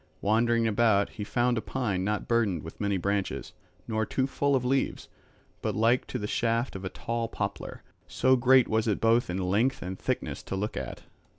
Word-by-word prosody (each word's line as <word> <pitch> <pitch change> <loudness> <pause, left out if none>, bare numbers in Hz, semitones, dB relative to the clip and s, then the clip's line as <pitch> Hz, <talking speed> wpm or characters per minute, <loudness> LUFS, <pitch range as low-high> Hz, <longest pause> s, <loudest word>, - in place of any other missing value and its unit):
Wandering 115 +2 +2
about 110 -2 +3
he 105 - -7
found 120 +2 +1
a - - -5
pine 105 -9 -2
not 105 +2 -1
burdened 110 -8 +1
with 80 - -9
many 100 -1 +1
branches, 100 +1 -2 0.3
nor 110 -1 0
too 130 +4 0
full 140 +1 +1
of 125 -2 0
leaves, 135 +1 0 0.5
but - - -2
like 115 +3 +2
to - - -3
the 105 - -4
shaft 115 +3 0
of 95 - -6
a 95 - -3
tall 115 +3 -3
poplar; 100 -3 -5 0.2
so 130 0 +3
great 130 0 +5
was 110 +1 +1
it 105 - +1
both 115 0 +3
in 90 - -2
length 100 +8 +1
and 95 +1 -5
thickness - - -2
to - - -5
look 105 +3 -3
at. - - -6
115 Hz, 195 wpm, -28 LUFS, 100-120 Hz, 0.5 s, great